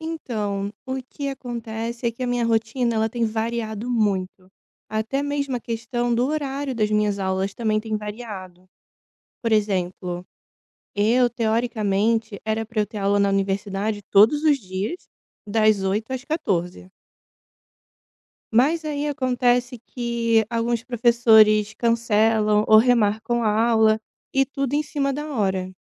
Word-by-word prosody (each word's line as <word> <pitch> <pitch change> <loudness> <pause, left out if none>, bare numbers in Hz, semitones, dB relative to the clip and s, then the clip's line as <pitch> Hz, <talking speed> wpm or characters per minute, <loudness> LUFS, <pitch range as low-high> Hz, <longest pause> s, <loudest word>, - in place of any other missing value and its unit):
Então, 215 -11 -3
o 260 0 -3
que 280 +2 -6
acontece 235 -2 -5
é 230 - +1
que 255 - -8
a - - 0
minha 245 -1 0
rotina, 230 +1 0
ela 220 0 +1
tem 235 -1 -1
variado 225 +1 -3
muito. 190 -5 -1 0.4
Até 225 +6 -2
mesmo 280 -3 -2
a - - -5
questão 235 +1 -2
do 240 +2 +2
horário 280 -2 -2
das 215 -3 0
minhas 210 -1 +1
aulas 190 +1 -1
também 215 -1 0
tem 220 -1 -3
variado. 205 -4 -8 0.8
Por 230 -2 -1
exemplo, 180 -3 -1 0.7
eu, 235 +4 +3
teoricamente, 220 -2 0
era 220 0 -1
pra 220 -1 -2
eu 210 - +1
ter 215 0 -8
aula 200 +1 +2
na 200 - +3
universidade 195 +1 -1
todos 225 +10 +5
os 300 -3 +4
dias, 195 - -5 0.4
das 215 -1 +2
8h00 215 +6 -1
às 260 0 -4
14h00. 185 - -2 1.6
Mas 280 +9 +3
aí 295 -1 -2
acontece 250 -2 0
que 235 -2 0
alguns 230 0 -1
professores 225 -3 +4
cancelam 220 -2 +2
ou 215 - +7
remarcam 235 0 +2
a 220 +1 +2
aula 220 -1 +4 0.3
e 270 0 +2
tudo 275 -1 -3
em 295 - +2
cima 275 -2 -2
da 300 +2 -5
hora. 190 -4 -1
225 Hz, 140 wpm, -23 LUFS, 210-245 Hz, 1.6 s, ou